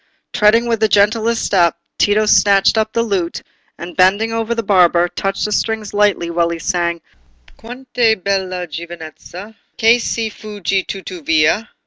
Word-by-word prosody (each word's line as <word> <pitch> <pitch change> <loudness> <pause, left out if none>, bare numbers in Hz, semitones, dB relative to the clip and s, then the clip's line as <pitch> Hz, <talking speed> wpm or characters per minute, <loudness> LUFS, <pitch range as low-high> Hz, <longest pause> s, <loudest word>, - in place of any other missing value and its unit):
Treading 215 +3 +3
with 230 -2 -1
the 220 - +3
gentlest 220 +3 +1
step, 175 -3 +2 0.2
Tito 210 +1 +2
snatched 200 -1 +4
up 220 0 0
the 230 - 0
lute, 190 -6 -3 0.3
and 175 +1 -9
bending 200 +5 +2
over 225 +1 -2
the 230 - -2
barber, 175 -3 +3
touched 195 +2 -3
the 210 - -3
strings 220 0 -2
lightly 205 -4 +1
while 170 0 0
he 170 - -4
sang— 170 0 -2 0.5
"Quant' 250 +3 -12
è 230 -3 +3
bella 185 -2 -3
giovinezza, 170 +4 -10 0.2
Che 230 +2 +4
si 225 -1 -3
fugge 200 -3 -3
tuttavia! 175 +1 -1
200 Hz, 150 wpm, -17 LUFS, 175-220 Hz, 0.5 s, snatched